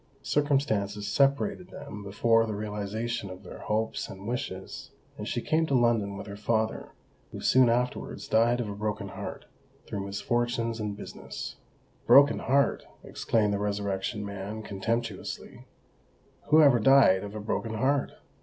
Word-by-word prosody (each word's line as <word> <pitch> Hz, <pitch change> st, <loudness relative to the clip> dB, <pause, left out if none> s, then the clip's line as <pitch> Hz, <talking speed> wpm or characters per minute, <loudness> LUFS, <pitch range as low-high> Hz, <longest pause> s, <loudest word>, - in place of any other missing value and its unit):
Circumstances 110 Hz, -9 st, 0 dB
separated 145 Hz, -, +1 dB
them 105 Hz, -, -8 dB
before 115 Hz, +3 st, +2 dB
the 110 Hz, -, -3 dB
realisation 105 Hz, +1 st, -3 dB
of 95 Hz, 0 st, -10 dB
their -, -, -10 dB
hopes 110 Hz, +1 st, -2 dB
and 95 Hz, +1 st, -9 dB
wishes; 95 Hz, -6 st, -5 dB, 0.3 s
and -, -, -6 dB
she -, -, -2 dB
came 160 Hz, +1 st, +1 dB
to 140 Hz, -, +1 dB
London 110 Hz, -4 st, +1 dB
with 100 Hz, -, -7 dB
her 100 Hz, -, -7 dB
father, 110 Hz, +1 st, -1 dB, 0.4 s
who -, -, -7 dB
soon 130 Hz, -2 st, +5 dB
afterwards 125 Hz, +2 st, -1 dB
died 120 Hz, +2 st, +3 dB
of 120 Hz, -, -2 dB
a 100 Hz, -, -4 dB
broken 105 Hz, -1 st, -3 dB
heart -, -, -7 dB, 0.4 s
through 100 Hz, -, -4 dB
misfortunes 115 Hz, +2 st, -1 dB
in 105 Hz, -2 st, -3 dB
business." 105 Hz, -, -8 dB, 0.5 s
"Broken 140 Hz, +1 st, +7 dB
heart!" 140 Hz, +1 st, +2 dB, 0.2 s
exclaimed 105 Hz, -3 st, 0 dB
the 100 Hz, -, -1 dB
Resurrection 100 Hz, +1 st, -2 dB
Man 100 Hz, +2 st, -6 dB
contemptuously: 110 Hz, +1 st, -4 dB, 0.8 s
"who 155 Hz, +1 st, +7 dB
ever 135 Hz, -5 st, +6 dB
died 120 Hz, -6 st, +6 dB
of 105 Hz, +1 st, -7 dB
a -, -, -4 dB
broken 110 Hz, +1 st, -3 dB
heart? 135 Hz, +5 st, +1 dB
110 Hz, 145 wpm, -28 LUFS, 100-120 Hz, 0.8 s, Broken